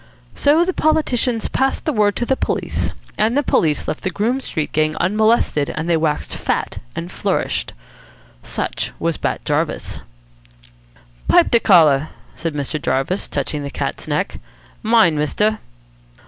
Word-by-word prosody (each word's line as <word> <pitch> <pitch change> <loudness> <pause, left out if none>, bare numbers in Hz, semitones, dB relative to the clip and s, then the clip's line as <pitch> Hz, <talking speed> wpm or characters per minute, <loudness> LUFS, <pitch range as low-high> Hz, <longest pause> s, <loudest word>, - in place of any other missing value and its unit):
So 310 +4 +3
the 370 - -1
politicians 250 -8 +1
passed 265 0 0
the 310 - 0
word 205 -2 +2
to 240 - -1
the 265 - +1
police, - - -1 0.3
and 225 +5 +2
the 290 - +2
police 155 - +1
left 155 - -3
the 185 - -1
Groome 230 +7 0
Street 155 - -3
Gang 155 0 +1
unmolested 210 -6 +2
and 160 +2 -3
they 170 - +3
waxed 155 -2 -1
fat - - -2 0.2
and - - -5
flourished. - - -1 0.7
Such - - -3
was 165 -1 -1
Bat - - -2
Jarvis. 150 +1 -1 1.3
"Pipe - - +5
de 235 - +5
collar," 155 -8 +5 0.3
said 165 -2 -4
Mr. 145 +1 -3
Jarvis, 135 +9 0
touching 145 +1 -2
the 140 - -4
cat's - - -4
neck. - - -2 0.4
"Mine, 220 -8 +4
mister." 210 +8 +1
180 Hz, 145 wpm, -19 LUFS, 150-235 Hz, 1.3 s, Pipe